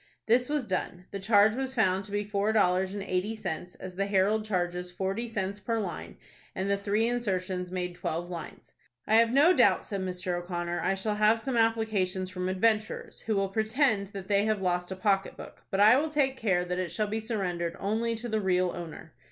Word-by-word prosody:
This 245 +3 +3
was 295 -4 0
done. 180 -2 -3
The 200 - -4
charge 205 +2 +4
was 265 0 -3
found 190 -4 +2
to 200 - -11
be 205 0 0
four 205 +1 0
dollars 190 -2 +2
and 200 - -4
eighty 195 +3 -1
cents, 180 -4 -5
as 185 -1 -9
the 195 0 0
"Herald" 200 +2 +2
charges 180 -3 -2
forty 195 +6 -3
cents 200 -2 -3
per 230 +1 -1
line, 185 -6 -5 0.4
and 190 - -2
the - - +4
three 205 +3 0
insertions 185 -6 -2
made 180 -1 -3
twelve 175 0 -3
lines. 175 -2 -9 0.3
"I 220 - +4
have 230 0 +5
no 295 +8 +6
doubt," - - +4
said 200 -3 -3
Mr. 180 -1 -2
O'Connor, 175 -1 -3
"I 190 - +1
shall 210 +2 -2
have 215 +2 +4
some 255 +2 -3
applications 215 -5 +1
from 185 0 -3
adventurers, 215 +3 0
who 220 - +1
will 195 -1 +1
pretend 220 0 +1
that 195 -1 -8
they 200 0 +3
have 215 -1 +1
lost 180 -1 -1
a - - -3
pocket 195 0 0
book; - - -11
but 195 - -1
I 215 +4 +8
will 310 +3 0
take 280 -3 +1
care 190 -8 +1
that 180 0 -2
it 185 -2 -2
shall 215 - 0
be 215 +2 -2
surrendered 180 -7 -2
only 225 +3 0
to 235 +2 -6
the 220 -2 0
real 185 -2 +2
owner." 170 -3 -8
200 Hz, 210 wpm, -29 LUFS, 185-220 Hz, 0.4 s, I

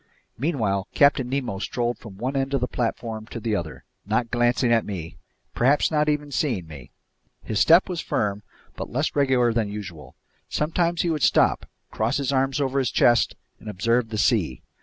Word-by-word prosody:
Meanwhile 110 - -1
Captain 140 -3 +4
Nemo 130 -7 -2
strolled 120 +3 -2
from 105 -5 -11
one 130 +6 -3
end 135 +1 0
of 135 - 0
the 125 - 0
platform 115 -2 -3
to 115 - -7
the 110 -1 -1
other, 85 -5 -5 0.2
not 110 +3 -1
glancing 120 0 +2
at 115 - +3
me, 85 -6 -6 0.4
perhaps 140 +6 +2
not 150 -1 +2
even 150 -1 -1
seeing 125 - -1
me. 75 -5 -11 0.5
His 110 - -2
step 170 - +6
was 175 -4 -3
firm 100 -1 -1 0.3
but - - -6
less 145 +6 -1
regular 130 -4 +3
than 110 -3 0
usual. 90 -10 -8 0.3
Sometimes 170 +2 0
he 170 - 0
would 155 -2 -2
stop, - - +3 0.2
cross 110 +2 0
his 140 -1 -1
arms 135 +1 +1
over 135 -1 0
his 130 -3 +1
chest, 120 0 +3 0.2
and 110 - -9
observe 115 +4 0
the 110 - -4
sea. 100 - +1
120 Hz, 180 wpm, -24 LUFS, 105-140 Hz, 0.5 s, step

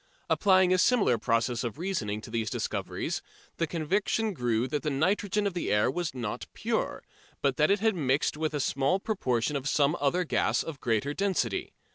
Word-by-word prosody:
Applying 190 -2 +4
a 185 - +3
similar 200 - +3
process 115 +2 0
of 120 0 -4
reasoning 140 - -2
to 110 - -10
these 110 -2 -1
discoveries, - - -3 0.4
the 165 - 0
conviction 195 +7 0
grew 120 -4 0
that 145 +2 -2
the 155 - -1
nitrogen 195 +8 +1
of 200 - 0
the 175 - -2
air 105 +4 +3
was 170 0 -3
not 115 -4 -4
pure, - - -2 0.4
but 135 -2 +1
that 150 - +4
it 200 0 +2
had 220 0 +3
mixed 140 -5 +1
with 155 0 -2
it - - +1
a - - -1
small 140 +9 +1
proportion 145 - -1
of 140 0 -1
some 145 +3 +3
other 145 +6 +1
gas 170 - +1
of 160 -4 -7
greater 120 +5 0
density. 185 - -1
150 Hz, 190 wpm, -28 LUFS, 125-185 Hz, 0.4 s, Applying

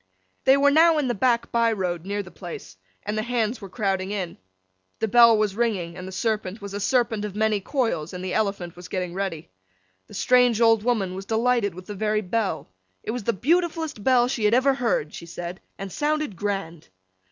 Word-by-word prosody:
They 265 +1 +6
were 285 0 +4
now 320 +2 +5
in 290 -3 +1
the 240 - +1
black 235 +2 +1
by 230 -1 +3
road 180 -4 -3
near 205 0 -2
the 185 - -13
place, 165 - -9 0.3
and 210 +1 -3
the 215 - 0
Hands 230 0 -1
were 195 - -8
crowding 190 -2 -1
in. 190 -4 -4 0.6
The 220 - -1
bell 235 0 +7
was 210 -2 0
ringing, 200 -8 -1
and 185 0 -7
the - - -7
Serpent 215 0 -2
was 200 -2 -8
a 205 - -3
Serpent 225 -1 +1
of 205 -2 -5
many 215 -1 +1
coils, 210 - -1
and 180 0 -6
the 185 - -3
Elephant 195 -5 -1
was 180 0 -10
getting 180 -2 -3
ready. 180 - -4 0.6
The - - -12
strange 250 -3 +4
old 225 -2 +5
woman 215 -6 0
was 190 +1 -7
delighted 225 -4 +1
with 185 0 -10
the 210 - -6
very 215 +1 0
bell. 200 -3 -2 0.4
It - - -3
was 240 -3 -5
the 235 - +2
beautifullest 320 - 0
bell 245 -1 +4
she 240 -4 -1
had 210 +3 +4
ever 265 +2 +4
heard, 230 - -1
she 170 - -9
said, 175 +2 -7 0.2
and 195 -1 -6
sounded 300 -5 -1
grand! 195 -4 -4
210 Hz, 210 wpm, -24 LUFS, 185-240 Hz, 0.6 s, bell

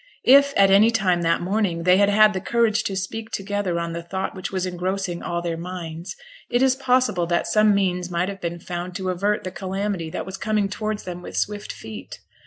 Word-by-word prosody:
If 280 +2 +6
at 195 -1 +6
any 205 +3 +6
time 185 -6 +1
that 165 0 +1
morning 185 -3 0
they 180 +1 +5
had 200 0 +4
had 215 +1 +5
the 190 - -3
courage 230 -1 +1
to 195 - -2
speak 220 +4 -4
together 195 -3 -2
on 170 0 -3
the 170 - -4
thought 190 +3 -4
which 185 - -6
was 185 -1 -1
engrossing 180 0 -3
all 170 0 -3
their 170 -1 -2
minds, 170 -1 -6 0.3
it 245 +2 +2
is 260 -1 +4
possible 250 -9 +1
that 170 0 +1
some 215 -1 +4
means 180 -2 0
might 175 +1 0
have 195 -1 -6
been 170 0 -3
found 175 +1 -6
to 190 -2 -2
avert 200 +4 0
the 185 - -5
calamity 190 -2 -3
that - - -5
was 190 0 -6
coming 215 -2 0
towards 215 +1 -3
them 180 -1 -6
with - - -7
swift 205 0 -2
feet. 110 -3 -9
190 Hz, 215 wpm, -23 LUFS, 175-210 Hz, 0.3 s, If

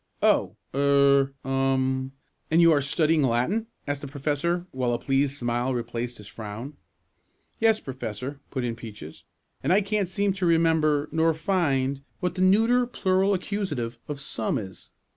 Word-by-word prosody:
"Oh! - - +3 0.2
er 140 0 +4
um 135 0 0 0.4
and 160 - +3
you 170 -1 +7
are 145 -2 +4
studying 155 +3 +2
Latin?" 135 - +1 0.2
asked 145 -1 -2
the 145 - -6
professor, 150 +5 -1
while 125 -2 -1
a - - +1
pleased 135 +1 0
smile 120 +1 -1
replaced 120 0 -4
his 105 - -11
frown. 110 +6 -7 0.9
"Yes, 225 -1 +4
Professor," 130 - -6
put 130 -3 -3
in 120 -2 -2
Peaches. 105 -9 -10 0.4
"And - - 0
I 195 +3 +5
can't 205 -1 0
seem 200 +2 0
to 190 -1 -2
remember, 160 -3 +3
nor 160 +1 +2
find, 140 -6 0 0.2
what 180 -1 -1
the 185 - -3
neuter 225 +6 +4
plural 195 -3 +1
accusative 150 - -3
of 145 -2 -5
'some' 125 -2 -2
is. 95 -5 -8
140 Hz, 155 wpm, -26 LUFS, 130-175 Hz, 0.9 s, you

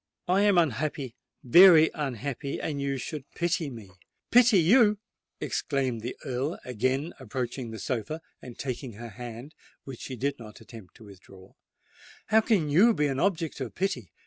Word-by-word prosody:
"I 185 +3 +3
am 205 -2 +4
unhappy—very 155 +3 +4
unhappy—and 140 +1 -4
you 140 -1 -1
should 140 +1 -7
pity 170 -3 -1
me!" 110 -7 -11 0.4
"Pity 245 -3 +6
you!" 210 +5 +5 0.4
exclaimed 130 -6 -2
the 120 +3 -6
Earl, 135 +5 -2
again 130 +6 -1
approaching 125 0 -5
the 110 - -7
sofa, 125 +8 -3 0.2
and 125 -2 -11
taking 130 -2 -5
her 115 +3 -9
hand, 120 +5 -9 0.3
which 135 -3 -9
she 130 - -6
did 140 +3 -2
not 110 -2 -11
attempt 110 -5 -13
to - - -15
withdraw: 95 -2 -16 0.8
"how 220 +1 +5
can 190 -10 +1
you 210 +9 +5
be 150 - +1
an 135 -2 -1
object 170 -5 -1
of 125 - -5
pity? 125 - -2
135 Hz, 150 wpm, -27 LUFS, 120-165 Hz, 0.8 s, Pity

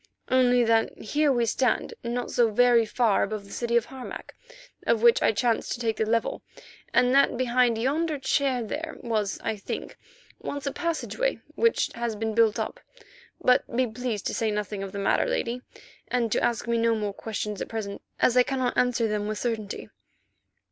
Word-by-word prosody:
"Only 250 -1 +4
that 225 -1 +2
here 290 +6 +1
we 240 -3 +2
stand 245 +2 0
not 240 +1 -3
so 235 -2 +3
very 235 0 +4
far 220 -1 +2
above 210 0 -2
the 200 - -14
city 235 0 0
Harmac, 250 +2 -5 0.5
of 230 -1 +2
which 235 -1 +6
I - - +4
chanced 230 +1 0
to - - -6
take 225 -2 -1
the 220 - 0
level, 230 0 0 0.5
and 250 0 +3
that 275 -3 +4
behind 245 -2 +2
yonder 300 +6 0
chair 265 -2 +1
there 300 +9 -5
was, 215 -5 -1
I 220 - -1
think, 195 - -6 0.4
once 285 0 -5
a 275 - 0
passage 335 0 -3 0.4
which 460 0 +2
has 235 -1 -3
been 220 +1 -2
built 225 -1 +3
up. - - -3 0.6
But 250 0 +4
be 255 +1 +3
pleased 225 -2 -4
to - - -1
say 225 -3 0
nothing 210 -1 -3
of 195 -1 -5
the 200 - -6
matter, 200 - +2
Lady, 250 - -1 0.5
and 235 -3 0
to - - +1
ask 235 0 0
me 235 0 +1
no 230 0 +3
more 210 -2 -2
questions 210 -1 -4
at - - -4
present, 210 -3 -5 0.2
as 245 - +3
I 250 - +7
cannot 255 -1 -1
answer 245 -2 +2
them 210 -1 -2
with 215 0 -3
certainty." 215 -3 -3
235 Hz, 185 wpm, -26 LUFS, 220-250 Hz, 0.6 s, I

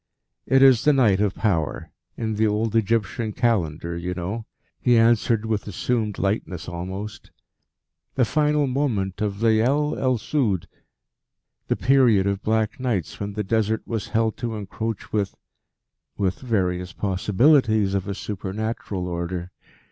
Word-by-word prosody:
"It 135 0 +5
is 130 -4 +6
the 150 - +5
Night 110 -8 +3
of 105 -2 +1
Power 85 -8 -1 0.3
in 110 -2 -2
the 110 +1 +2
old 105 +1 0
Egyptian 110 0 0
Calendar, 85 -9 0
you 90 +1 -4
know," 100 +6 -4 0.3
he 120 -2 +4
answered 115 -1 +3
with 110 -2 -2
assumed 105 +1 -1
lightness 95 -4 -2
almost, 95 +4 -6 0.9
"the 130 - +3
final 150 +1 +2
moment 125 -9 -1
of 105 0 -2
Leyel 125 +7 +2
el 130 -2 +1
Sud, 110 - -1 1.0
the - - +1
period 125 -7 +4
of 100 0 -1
Black 110 0 0
Nights 115 - -2
when 100 0 -4
the 105 +1 -2
Desert 110 +1 0
was 115 -3 -3
held 110 -1 0
to 120 -2 -3
encroach 110 +1 -5
with 100 -3 -1 0.8
with 95 -2 -1
various 90 -7 -1
possibilities 105 +2 +2
of 100 0 -1
a 100 - -3
supernatural 100 -1 -4
order. 85 +1 -4
110 Hz, 140 wpm, -23 LUFS, 95-115 Hz, 1.0 s, is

